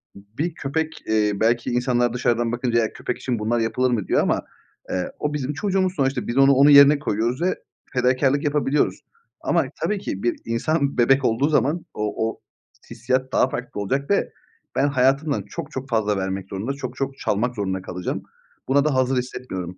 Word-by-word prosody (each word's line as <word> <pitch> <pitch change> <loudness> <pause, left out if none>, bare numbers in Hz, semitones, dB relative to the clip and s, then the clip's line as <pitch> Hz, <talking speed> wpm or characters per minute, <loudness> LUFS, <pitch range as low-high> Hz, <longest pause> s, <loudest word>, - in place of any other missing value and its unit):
bir 110 - -5
köpek, 160 +3 -3
eee, 105 -1 +2
belki 120 +1 +1
insanlar 120 -1 +1
dışarıdan 120 -1 0
bakınca 120 -1 0
"Eğer 110 -1 -1
köpek - - -4
için 125 -4 -2
bunlar 115 +3 0
yapılır 125 +3 +1
mı?" 110 -5 -1
diyor - - +3
ama, - - +1 0.5
eee, 90 - -2
o 150 0 -1
bizim 145 -1 -2
çocuğumuz 185 +2 0
sonuçta. 135 -4 0
Biz 120 - -3
onu 135 0 +6
onun 140 +2 +6
yerine 145 0 +8
koyuyoruz 120 0 -1
ve 185 +2 +1 0.4
fedakârlık 130 +2 +2
yapabiliyoruz. 145 -1 +1 0.4
Ama - - +1 0.2
tabii 210 -1 0
ki 100 - -5
bir 120 - +1
insan 140 +5 0
bebek 135 +2 +4
olduğu 125 +6 +2
zaman 155 +3 +1
o 105 +1 -1
o - - -9 0.5
hissiyat 130 +3 -1
daha 130 - +3
farklı 125 -5 -5
olacak 135 +8 -2
ve 200 - +1 0.4
ben 140 - +3
hayatımdan 140 +2 +2
çok 160 -2 -7
çok 135 -2 -6
fazla 105 -4 +1
vermek 95 0 -3
zorunda, 105 +8 -3
çok 140 - -6
çok 135 0 -3
çalmak 120 +4 0
zorunda 95 -3 -2
kalacağım. 90 -1 -4 0.4
Buna 140 +2 +3
da 155 - +2
hazır 130 0 +2
hissetmiyorum. 95 -8 -5
125 Hz, 180 wpm, -23 LUFS, 115-140 Hz, 0.5 s, yerine